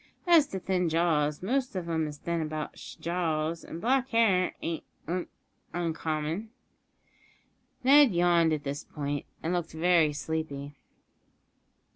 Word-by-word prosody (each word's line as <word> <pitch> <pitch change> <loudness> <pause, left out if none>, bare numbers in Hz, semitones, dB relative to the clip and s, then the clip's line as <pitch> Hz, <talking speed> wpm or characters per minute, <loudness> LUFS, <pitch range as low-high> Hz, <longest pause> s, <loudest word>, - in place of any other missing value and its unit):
As 335 -5 +6
to 190 - -4
thin 180 -2 0
jaws, 155 -2 +1
most 255 +3 0
of 180 -2 -3
'em 160 -2 0
is 150 -1 -7
thin 170 +2 -2
about 155 -1 -4
sh' - - -9
jaws, 165 -2 -1
an' 165 - -7
black 260 +5 +1
hair 210 -6 +3
ain't 165 -1 -3 0.2
un 175 +2 -2 0.5
uncommon." 165 +3 -2 1.3
Ned 280 +1 +7
yawned 170 -2 +4
at 150 -2 -1
this 140 0 -4
point, 145 -1 -4 0.2
and 165 +3 0
looked 175 -3 -2
very 165 -1 +3
sleepy. 145 -2 -4
170 Hz, 135 wpm, -29 LUFS, 155-185 Hz, 1.3 s, Ned